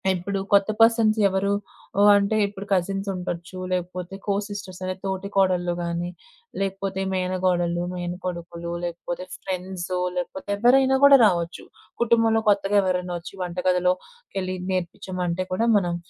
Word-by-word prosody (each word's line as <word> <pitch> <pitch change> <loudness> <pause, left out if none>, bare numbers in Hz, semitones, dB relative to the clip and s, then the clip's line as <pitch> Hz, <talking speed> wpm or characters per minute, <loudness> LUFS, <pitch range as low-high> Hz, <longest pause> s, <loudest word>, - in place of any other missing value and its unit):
ఇప్పుడు 195 +2 -3
కొత్త 200 +1 +5
పర్సన్స్ 225 -1 +5
ఎవరు 195 +1 0 0.6
అంటే, 200 +2 +2
ఇప్పుడు 200 0 -8
కజిన్సుండొచ్చు, 185 -1 -2
లేకపోతే 180 +1 -3
కోసిస్టర్స్ 200 -2 -3
అంటే 185 0 -2
తోటి 190 +1 -3
కోడళ్ళు, 180 -2 +2
గానీ 170 +1 -2 0.5
లేకపోతే 195 0 -2
మేనకోడలు, 180 -2 0
మేనకొడుకులు, 175 -1 -5
లేకపోతే 175 +1 -4 0.2
ఫ్రెండ్స్ 185 -1 -4 0.3
లేకపోతే 190 +2 -5
ఎవ్వరైనా 265 +4 +5
కూడా 280 -1 +9
రావచ్చు. 170 -3 0 0.4
కుటుంబంలో 225 -1 +3
కొత్తగా 200 0 +3
ఎవరైనా 180 -1 -1
వచ్చి 170 - -10
వంటగదిలోకెళ్లి 185 - -1
నేర్పించమంటే 185 0 -2
కూడా 230 +5 +1
మనం 175 -3 0
185 Hz, 110 wpm, -24 LUFS, 180-200 Hz, 0.6 s, కూడా